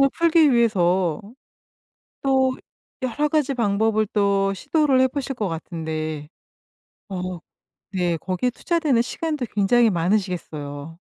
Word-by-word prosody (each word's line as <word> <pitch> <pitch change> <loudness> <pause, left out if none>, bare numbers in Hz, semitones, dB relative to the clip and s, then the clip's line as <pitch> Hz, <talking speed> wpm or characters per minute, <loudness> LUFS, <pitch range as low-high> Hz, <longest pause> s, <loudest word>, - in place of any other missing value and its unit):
궁금증을 275 -1 +5
풀기 330 -3 +4
위해서 185 -8 +2 1.0
또 265 -1 +2 0.5
여러 260 +4 0
가지 295 -3 +1
방법을 215 -2 +1
또 200 -1 +2
시도를 275 - +1
해 260 - +5
보실 270 +1 -4
것 210 -5 -2
같은데 155 -3 -5 0.8
어 185 -2 -4 0.5
네 175 -4 0
거기에 185 +9 -1
투자되는 305 -2 +1
시간도 300 +2 -2
굉장히 225 +4 +4
많으시겠어요. 165 -5 -2
210 Hz, 265 characters per minute, -23 LUFS, 175-260 Hz, 1.0 s, 궁금증을